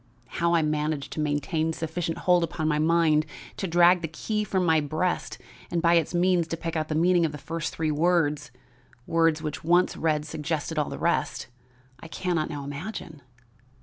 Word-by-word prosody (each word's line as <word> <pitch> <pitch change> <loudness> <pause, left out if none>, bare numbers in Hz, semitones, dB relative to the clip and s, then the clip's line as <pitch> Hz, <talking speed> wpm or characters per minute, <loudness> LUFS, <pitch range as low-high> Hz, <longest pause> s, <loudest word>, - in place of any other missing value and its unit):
"How 170 0 +3
I 165 - +3
managed 150 -1 -2
to - - -5
maintain 155 +2 0
sufficient 165 +1 -3
hold 175 0 +3
upon 160 -1 -2
my 150 -1 +1
mind 160 -1 +3 0.3
to 195 - -2
drag 175 +1 +5
the 165 - -2
key 210 +7 -2
from 190 -3 0
my 160 -1 +4
breast 155 +5 -2 0.3
and 175 - 0
by 170 +1 +3
its 170 0 +2
means 175 -1 +2
to 165 - -4
pick 165 0 -4
out 155 -1 -1
the 155 - -2
meaning 175 +2 +3
of 160 - +1
the - - -5
first 165 +2 -4
three 160 -1 0
words 155 -1 +1 0.6
words 165 -1 +2
which 150 -1 -4
once 175 +3 +3
read 155 -2 0
suggested 155 0 -3
all 150 - -1
the - - -6
rest - - -1 0.5
I 165 - -10
can 180 +2 -2
not 155 -2 -1
now 145 -3 -5
imagine. 155 +1 -7
160 Hz, 190 wpm, -26 LUFS, 155-170 Hz, 0.6 s, drag